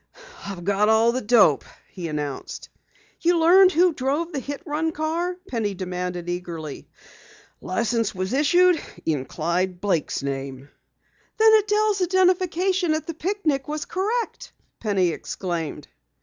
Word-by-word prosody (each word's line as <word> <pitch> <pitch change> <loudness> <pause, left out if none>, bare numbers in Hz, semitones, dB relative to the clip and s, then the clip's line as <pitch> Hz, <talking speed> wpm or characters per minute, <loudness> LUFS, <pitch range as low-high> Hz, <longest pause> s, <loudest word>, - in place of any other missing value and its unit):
"I've 190 -3 -6
got 200 +2 +2
all 220 +1 +4
the 255 +2 -2
dope!" 210 - +4 0.3
he 175 -3 -6
announced. 150 -3 -5 0.5
"You 345 0 +2
learned 365 +3 +6
who 355 +1 +3
drove 290 +6 -1
the 290 - -3
hit 280 +2 -6
run 315 +1 -1
car?" 330 +4 -2
Penny 215 -5 -2
demanded 180 -1 -4
eagerly. 170 -4 -5 0.7
"The - - -12
license 230 +2 0
was 185 +4 -3
issued 350 +5 +4 0.2
in 145 -5 -1
Clyde 175 +5 -2
Blake's 175 -8 -1
name!" 135 0 -5 0.7
"Then 440 0 +6
Adelle's 420 -1 +3
identification 365 -1 +2
at 310 - -3
the 330 - -5
picnic 315 -5 -1
was 300 0 -3
correct!" 440 +6 -3 0.3
Penny 195 -5 +1
exclaimed. 170 -1 -4
255 Hz, 135 wpm, -23 LUFS, -, 0.7 s, learned